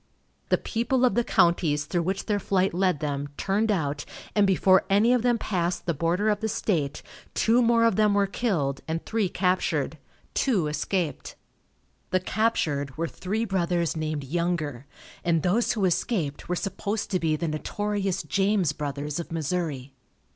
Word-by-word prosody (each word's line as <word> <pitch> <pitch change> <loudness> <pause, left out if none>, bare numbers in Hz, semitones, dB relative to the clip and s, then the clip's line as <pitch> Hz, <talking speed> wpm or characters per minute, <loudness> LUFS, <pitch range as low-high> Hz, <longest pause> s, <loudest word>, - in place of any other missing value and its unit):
The - - +4
people 245 +3 0
of 250 - +3
the 240 - +2
counties 165 -8 +2
through 175 +3 0
which 190 +3 -2
their 205 -2 0
flight 190 -1 +1
led 180 -4 +1
them, 145 -1 -2
turned 210 +3 +1
out, 145 -6 -1 0.3
and 205 -2 +4
before 190 0 +4
any 210 +5 +4
of 250 - +2
them 240 0 +2
passed 180 -5 -2
the 170 - +1
border 170 +8 +1
of 210 -1 +1
the 220 0 -2
state, 155 -9 -1 0.3
two 235 +2 +4
more 230 -1 +4
of 230 -5 +3
them 210 -1 +4
were 200 0 +4
killed 175 - -1
and 160 +1 -3
three 220 -4 0
captured. 185 0 0 0.3
Two 215 - +1
escaped. 150 +1 -2 0.7
The 185 - +2
captured 160 - 0
were 165 +1 -1
three 210 +7 -2
brothers 175 -4 0
named 155 -2 -2
Younger, 155 -4 -2 0.4
and 165 -3 +1
those 220 +7 +2
who 210 -5 0
escaped 170 -5 -1
were 180 - +1
supposed 200 +3 -3
to 185 - +1
be 160 -2 +1
the 165 +2 -2
notorious 195 +5 -2
James 195 -1 +1
Brothers 145 +1 -4
of 170 - -6
Missouri. 155 -5 -2
180 Hz, 165 wpm, -26 LUFS, 155-205 Hz, 0.7 s, The